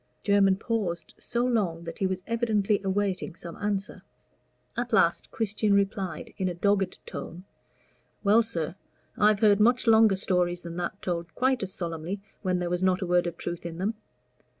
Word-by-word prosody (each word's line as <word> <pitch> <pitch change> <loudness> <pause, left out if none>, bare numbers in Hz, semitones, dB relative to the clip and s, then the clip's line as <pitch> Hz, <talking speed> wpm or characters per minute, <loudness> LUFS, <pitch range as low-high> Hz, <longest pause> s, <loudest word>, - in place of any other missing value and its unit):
Jermyn 200 -2 +4
paused 195 -6 -3
so 240 +1 -1
long 195 -9 0
that 165 -1 -7
he 195 - +2
was 185 -1 -3
evidently 220 -3 +1
awaiting 195 -2 -1
some 170 -1 -8
answer. 205 -1 -2 0.7
At - - -3
last - - +3
Christian 210 -1 0
replied 195 -4 -1
in 185 -1 +1
a 175 - -4
dogged 195 +1 +1
tone 175 +2 -7 0.8
"Well, 210 +3 +6
sir, 170 -8 -2 0.4
I've 210 0 +3
heard 205 -2 +5
much 240 +4 +4
longer 220 -3 +6
stories 180 -2 0
than 170 0 -7
that 180 +3 -4
told 170 -2 -3
quite 260 0 +2
as 195 -1 -3
solemnly, 170 +1 -4 0.2
when 185 -2 0
there 175 -1 -2
was 180 0 0
not 185 0 +2
a - - -1
word 175 0 +2
of 170 -1 -5
truth 175 -1 -5
in 170 -1 -6
them. 200 +5 -1
195 Hz, 175 wpm, -27 LUFS, 175-210 Hz, 0.8 s, Well